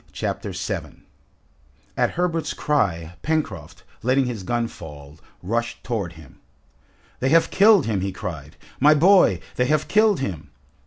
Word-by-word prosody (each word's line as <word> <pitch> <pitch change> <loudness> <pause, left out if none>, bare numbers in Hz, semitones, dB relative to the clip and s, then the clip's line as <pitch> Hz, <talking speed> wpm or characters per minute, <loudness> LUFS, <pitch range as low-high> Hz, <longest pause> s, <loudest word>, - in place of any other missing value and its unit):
Chapter - - -4
7 - - -5 0.9
At - - +2
Herbert's 170 -2 -1
cry, 85 - -1
Pencroft, 95 - -3 0.2
letting 130 +3 +2
his 120 -5 -4
gun 120 +5 -1
fall, 75 -6 -12 0.2
rushed 115 +5 -2
towards 100 -8 -3
him. 80 -4 -16 0.8
"They 130 - +1
have 165 +3 +4
killed 205 0 +5
him!" 105 -4 -1
he 95 +1 -2
cried. 80 -6 -7 0.2
"My 150 +3 +6
boy! 170 - +5 0.2
They 125 - +2
have 155 +3 +1
killed 215 -2 +3
him!" 85 - -5
115 Hz, 140 wpm, -23 LUFS, -, 0.9 s, My